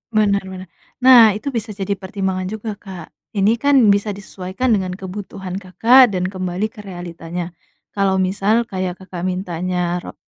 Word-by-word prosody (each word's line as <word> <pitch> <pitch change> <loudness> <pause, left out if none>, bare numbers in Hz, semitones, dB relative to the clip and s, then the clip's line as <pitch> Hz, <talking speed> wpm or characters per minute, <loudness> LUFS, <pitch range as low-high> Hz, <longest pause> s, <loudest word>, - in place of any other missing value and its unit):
Bener 205 -2 +3
bener. 185 0 -8 0.4
Nah, 235 -5 +8
itu 280 +7 -4
bisa 225 -4 -4
jadi 195 0 -4
pertimbangan 190 -1 -3
juga, 220 +1 -5
Kak. 185 -6 -10 0.2
Ini 210 +4 +2
kan 285 0 +3 0.2
bisa 200 0 0
disesuaikan 195 +4 -3
dengan 185 -3 0
kebutuhan 190 0 -6
Kakak 230 +4 +5
dan 180 +1 -1
kembali 185 +3 -3
ke - - -15
realitanya. 175 -2 -6 0.4
Kalau 195 -1 +1
misal 195 +4 +1
kayak 185 -5 -4
Kakak 185 -1 -5
mintanya 180 -1 -2
ro - - -10
190 Hz, 150 wpm, -19 LUFS, 185-210 Hz, 0.4 s, Nah